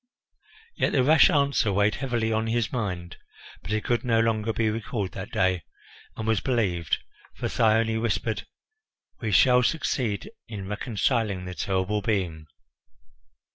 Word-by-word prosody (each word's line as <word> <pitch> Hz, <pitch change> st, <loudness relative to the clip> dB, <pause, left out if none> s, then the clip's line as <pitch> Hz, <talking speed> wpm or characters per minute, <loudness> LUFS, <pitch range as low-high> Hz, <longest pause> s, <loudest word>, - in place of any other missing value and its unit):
Yet -, -, 0 dB
the 130 Hz, -, +3 dB
rash 155 Hz, +7 st, +6 dB
answer 140 Hz, -, +2 dB
weighed 105 Hz, +2 st, +2 dB
heavily 120 Hz, -4 st, -1 dB
on 110 Hz, +1 st, 0 dB
his 115 Hz, -1 st, 0 dB
mind; 90 Hz, -7 st, -3 dB, 0.4 s
but 90 Hz, -, -7 dB
it 110 Hz, 0 st, 0 dB
could 120 Hz, -1 st, 0 dB
no 115 Hz, -3 st, +2 dB
longer 115 Hz, -1 st, +1 dB
be 110 Hz, 0 st, 0 dB
recalled 110 Hz, -3 st, -3 dB
that 95 Hz, +1 st, -7 dB
day, 95 Hz, -2 st, +1 dB, 0.6 s
and 110 Hz, -, -4 dB
was 110 Hz, -2 st, +2 dB
believed, 100 Hz, -10 st, 0 dB, 0.4 s
for -, -, -3 dB
Thyone 110 Hz, 0 st, +2 dB
whispered, 115 Hz, 0 st, -1 dB, 0.7 s
"We 110 Hz, -3 st, -2 dB
shall 125 Hz, +5 st, +6 dB
succeed 125 Hz, -, -1 dB, 0.2 s
in 100 Hz, -4 st, -6 dB
reconciling 105 Hz, -2 st, -1 dB
the 90 Hz, -, -5 dB
terrible 95 Hz, +3 st, -1 dB
being." 90 Hz, -8 st, -2 dB
110 Hz, 140 wpm, -26 LUFS, 100-120 Hz, 0.7 s, rash